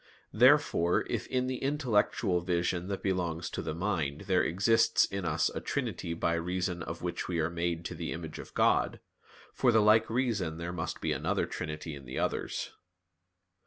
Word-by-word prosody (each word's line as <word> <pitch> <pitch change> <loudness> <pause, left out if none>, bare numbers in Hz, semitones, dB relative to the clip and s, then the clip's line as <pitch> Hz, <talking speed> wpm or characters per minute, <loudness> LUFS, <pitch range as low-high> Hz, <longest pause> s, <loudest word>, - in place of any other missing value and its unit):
Therefore, 85 +1 +4
if - - -2
in 130 -1 0
the 130 -1 -3
intellectual 120 - +1
vision 85 0 -1
that 100 -1 -4
belongs 90 -4 -1
to - - -3
the 80 -1 -4
mind 80 -6 -1
there 95 -2 +2
exists 105 +7 +3
in 100 -2 -4
us 80 -1 +1
a - - -4
trinity 85 - -3
by 85 0 0
reason 90 +1 -2
of 80 +1 -6
which 90 -1 -3
we 85 -2 -1
are 80 +2 0
made 85 0 -2
to - - -4
the - - -5
image 80 -1 -6
of - - -10
God, - - +2 0.5
for 125 - +3
the 110 - +5
like 110 +1 +5
reason 110 -10 0
there 85 +1 -4
must 85 - -4
be - - 0
another - - 0
trinity 75 +1 -5
in 70 -2 -9
the 65 - -6
others. - - -2
85 Hz, 180 wpm, -30 LUFS, 85-105 Hz, 0.5 s, the